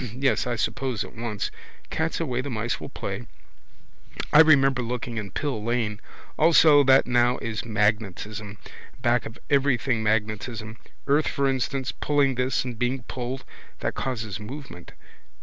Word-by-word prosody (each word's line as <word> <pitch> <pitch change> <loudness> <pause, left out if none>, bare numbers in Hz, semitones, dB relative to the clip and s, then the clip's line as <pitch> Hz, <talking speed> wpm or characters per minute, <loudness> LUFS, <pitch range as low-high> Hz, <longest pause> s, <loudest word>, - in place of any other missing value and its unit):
Yes, 135 -1 +1
I 120 - 0
suppose, 125 -1 -1
at - - -11
once. 115 -3 -3 0.4
Cat's 160 +1 -1
away, 130 -7 -1
the 140 - -5
mice 115 -1 -2
will - - -6
play. - - -5 1.1
I 150 - +8
remember 135 -5 +6
looking 120 0 -4
in 105 -2 -4
Pill 130 0 -3
lane. 115 -2 -1 0.4
Also 155 -2 +7
that 135 0 +6
now 120 0 +3
is 115 -1 -4
magnetism. 105 -1 -1 0.5
Back 120 0 +2
of 115 - -11
everything 130 -4 +2
magnetism. 110 +1 -2 0.3
Earth 145 +2 +3
for 140 0 +1
instance 135 0 -1
pulling 145 -2 +1
this 125 0 0
and 120 -3 -6
being 125 +1 0
pulled. 125 +2 -5 0.4
That - - -1
causes 110 -7 -3
movement. 105 - -9
125 Hz, 145 wpm, -25 LUFS, 110-135 Hz, 1.1 s, I